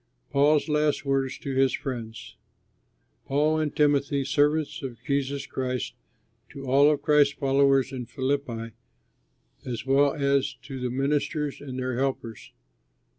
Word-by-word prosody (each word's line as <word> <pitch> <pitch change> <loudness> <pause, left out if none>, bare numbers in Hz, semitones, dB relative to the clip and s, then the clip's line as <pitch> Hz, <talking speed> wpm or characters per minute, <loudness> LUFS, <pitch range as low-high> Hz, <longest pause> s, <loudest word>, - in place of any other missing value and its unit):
PAUL'S 145 +2 +3
LAST 150 -1 +1
WORDS 135 -1 0
TO 135 - -5
HIS 135 0 +3
FRIENDS 120 -6 -6 0.9
Paul 150 +3 +2
and 155 -2 -2
Timothy, 140 -2 +2
servants 150 +2 +1
of 125 -3 -6
Jesus 140 -1 -1
Christ, 130 -2 -3 0.6
to 135 -1 -9
all 140 +3 +5
of 150 -2 0
Christ's 145 -2 +4
followers 135 -1 +3
in 125 -3 -6
Philippi, 125 -2 -2 0.9
as 120 -1 -5
well 140 +2 +3
as 140 -2 +1
to 135 0 -7
the 125 0 -2
ministers 145 +3 -1
and 130 -3 -7
their 130 -1 -2
helpers. 130 -5 -3
140 Hz, 130 wpm, -26 LUFS, 130-145 Hz, 0.9 s, all